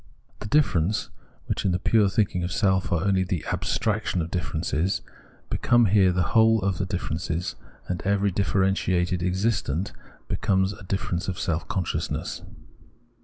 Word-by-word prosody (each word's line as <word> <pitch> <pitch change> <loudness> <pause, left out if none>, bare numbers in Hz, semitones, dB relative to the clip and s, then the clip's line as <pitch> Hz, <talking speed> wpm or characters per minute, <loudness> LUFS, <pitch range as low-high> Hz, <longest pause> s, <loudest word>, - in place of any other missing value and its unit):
The - - -6
differences, 105 - +1 0.3
which, - - -2
in 95 - +1
the - - +2
pure 105 +2 +3
thinking 95 -4 0
of 90 - -3
self 95 0 +1
are 85 -1 +1
only 95 -2 +3
the 90 -3 -3
abstraction 105 -3 -1
of 80 - -7
differences, 80 +1 -1 0.5
become 120 0 +3
here 95 -2 +4
the 90 -2 0
whole 110 0 +5
of 95 -3 0
the 95 - -1
differences; 85 -1 -3 0.3
and 90 -1 -3
every 100 0 +1
differentiated 95 -2 +1
existent 90 -2 0 0.4
becomes 95 -3 +1
a - - -13
difference 90 -2 -2
of 95 -2 -3
self 80 0 -2
consciousness. 90 -3 -2
95 Hz, 145 wpm, -25 LUFS, 90-100 Hz, 0.5 s, whole